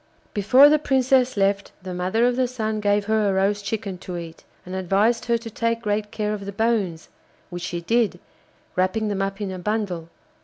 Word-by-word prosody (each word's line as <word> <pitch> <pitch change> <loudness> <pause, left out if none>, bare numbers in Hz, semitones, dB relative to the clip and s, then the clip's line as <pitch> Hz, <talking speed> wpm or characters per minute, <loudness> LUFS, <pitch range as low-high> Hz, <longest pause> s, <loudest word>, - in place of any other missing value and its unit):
Before 250 +8 +6
the 305 +1 +4
Princess 260 -3 +2
left 200 0 +1
the 185 -1 -5
mother 185 +6 +1
of 245 0 +2
the 255 0 +1
Sun 220 -3 -2
gave 205 0 +1
her 215 -1 +2
a - - +1
roast 200 +2 +1
chicken 200 -3 -4
to 180 -1 -6
eat, 165 -1 -9 0.2
and 180 - -8
advised 195 +5 +1
her 235 -1 +2
to 230 0 -9
take 230 +1 -1
great 210 0 -1
care 210 -1 -2
of 200 -2 -5
the 200 - -4
bones, 200 -6 -1 0.4
which 175 0 -5
she 175 -1 -4
did, 230 +4 +1 0.6
wrapping 185 +4 +1
them 200 -1 -1
up 195 0 -2
in 200 -2 -3
a 185 - -6
bundle. 185 -4 -2
205 Hz, 200 wpm, -23 LUFS, 190-230 Hz, 0.6 s, Before